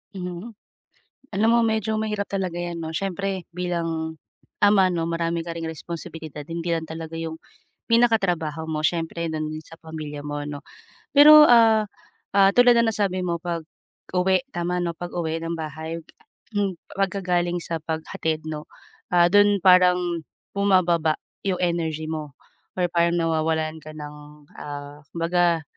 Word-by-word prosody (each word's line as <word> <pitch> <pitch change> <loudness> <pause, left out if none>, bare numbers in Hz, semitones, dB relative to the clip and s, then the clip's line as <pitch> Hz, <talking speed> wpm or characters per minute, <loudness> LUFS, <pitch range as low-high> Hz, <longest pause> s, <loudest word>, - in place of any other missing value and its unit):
Mhm. 180 +4 -6 0.8
Alam 210 +3 +2
mo - - +5
medyo 220 -1 0
mahirap 210 -2 -2
talaga 185 -3 -3
'yan 175 -1 -4
'no, 160 - -4
siyempre 195 +1 -3
bilang, 165 -3 -2 0.4
ama 200 -3 +5
'no, 165 -1 -1
marami 170 0 -1
ka 170 - -4
ring 165 - -5
responsibilidad, 160 -2 -7
hindi 170 +2 -2
lang 160 - -3
talaga 160 0 -7
'yong 160 0 -5 0.5
pinaka-trabaho 180 -10 +2
mo, 155 -1 -2
siyempre 165 +1 -1
do'n 155 -1 -2
din 155 0 -6
sa 165 - -15
pamilya 155 -2 -7
mo 145 0 -3
'no. 145 -1 -6 0.5
Pero, 300 +1 +10
ah 225 -2 +6 0.5
ah, 195 -1 +6
tulad 245 0 +7
ng 230 - +3
nasabi 200 -3 0
mo, 170 -1 -1
pag 170 -2 -3 0.5
uwi, 190 +8 +2
tama 175 +1 -1
'no? 170 -1 -2
Pag-uwi 165 -2 -3
ng 165 0 -2
bahay, 160 +1 -5 0.6
hmm, 200 -2 0 0.2
pagka-galing 180 -3 0
sa 165 -1 -4
paghatid 160 0 -3
'no, 150 -1 -4 0.5
ah, 175 -1 +5
doon 205 +1 +5
parang 180 0 +6 0.6
bumababa 175 -5 +2 0.2
'yong 190 -2 -1
energy 160 -3 -1
mo, 155 -3 -5 0.4
or 175 - +3
parang 170 0 +2
nawawalan 160 -1 0
ka 155 - -9
ng, 150 -1 -8 0.4
ah, 145 0 -8
kumbaga, 170 -1 +1
170 Hz, 145 wpm, -24 LUFS, 160-190 Hz, 0.8 s, Pero